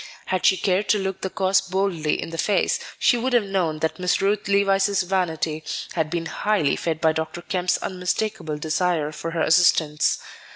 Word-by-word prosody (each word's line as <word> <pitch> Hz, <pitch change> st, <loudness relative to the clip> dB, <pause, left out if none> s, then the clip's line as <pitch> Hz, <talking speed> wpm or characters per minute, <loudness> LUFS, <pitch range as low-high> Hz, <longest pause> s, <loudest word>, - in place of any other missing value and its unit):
Had 185 Hz, -1 st, +1 dB
she 190 Hz, -, +4 dB
cared 190 Hz, +2 st, 0 dB
to 215 Hz, -, +4 dB
look 190 Hz, -1 st, -3 dB
the 190 Hz, -, -2 dB
cause 190 Hz, 0 st, +2 dB
boldly 190 Hz, -5 st, -1 dB
in -, -, -5 dB
the 165 Hz, -, -6 dB
face, 215 Hz, -, +1 dB, 0.2 s
she 245 Hz, -, +3 dB
would 250 Hz, +2 st, -1 dB
have 240 Hz, -3 st, +4 dB
known 185 Hz, -6 st, -1 dB
that 160 Hz, +3 st, -1 dB
Miss 180 Hz, 0 st, +1 dB
Ruth 200 Hz, +1 st, 0 dB
Levice's 200 Hz, 0 st, +2 dB
vanity 165 Hz, -4 st, -1 dB, 0.3 s
had 160 Hz, -3 st, -1 dB
been 170 Hz, 0 st, -3 dB
highly 205 Hz, -3 st, 0 dB
fed 160 Hz, -2 st, -2 dB
by 160 Hz, 0 st, +3 dB
Dr. 160 Hz, +2 st, -4 dB
Kemp's 180 Hz, 0 st, 0 dB
unmistakable 180 Hz, -3 st, -2 dB
desire 155 Hz, 0 st, 0 dB
for 160 Hz, +2 st, -5 dB
her 165 Hz, -1 st, -2 dB
assistance. 160 Hz, -3 st, +3 dB
180 Hz, 180 wpm, -23 LUFS, 160-195 Hz, 0.3 s, she